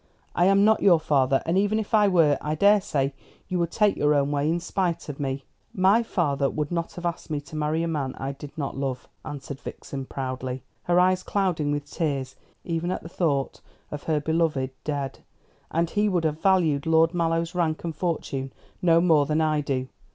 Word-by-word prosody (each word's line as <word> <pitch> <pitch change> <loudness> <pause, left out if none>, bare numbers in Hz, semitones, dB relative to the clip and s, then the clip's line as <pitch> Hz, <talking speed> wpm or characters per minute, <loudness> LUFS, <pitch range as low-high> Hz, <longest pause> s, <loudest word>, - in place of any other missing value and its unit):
I 175 - +3
am 195 +1 +5
not 220 0 +4
your 175 -5 +6
father, 135 -4 +2
and 170 +4 +2
even 205 +2 +1
if 220 -1 -4
I 210 -2 +5
were, 165 -6 +4
I 150 +1 -2
daresay 170 -8 +3 0.3
you 185 -2 -1
would 170 -1 +1
take 210 +2 +2
your 150 0 +3
own 140 0 +1
way 145 +1 +1
in 170 +2 +1
spite 170 -2 -2
of 145 - -6
me." 135 -1 -2 0.3
"My 195 +5 +4
father 145 -11 0
would 150 0 -3
not 170 -1 -2
have 175 - -7
asked 170 -1 -3
me 150 -2 -1
to 155 +2 -12
marry 155 +2 0
a - - -1
man 145 -5 -2
I 135 +1 -4
did 140 +1 -10
not 140 -3 -3
love," 135 -2 -3 0.2
answered 140 -1 -7
Vixen 135 -2 -7
proudly, 130 -1 -4 0.2
her 175 0 +3
eyes 185 0 +3
clouding 175 -7 0
with 145 -1 -2
tears 140 -4 -3 0.3
even 170 0 -2
at 185 - -3
the 165 - -8
thought 145 -6 -1 0.3
of 150 - -5
her 155 -2 +1
beloved 155 -4 0
dead; 140 -2 -3 0.5
"and 170 +1 +1
he 210 0 +2
would 180 -4 0
have 155 0 -1
valued 165 -7 +2
Lord 165 +1 +4
Mallow's 165 0 0
rank 165 -3 -1
and 165 -2 -4
fortune 145 -5 -3 0.3
no 170 -2 +5
more 155 -5 +4
than 155 +1 +1
I 155 -1 +2
do. 130 -2 -2
160 Hz, 205 wpm, -25 LUFS, 140-175 Hz, 0.5 s, your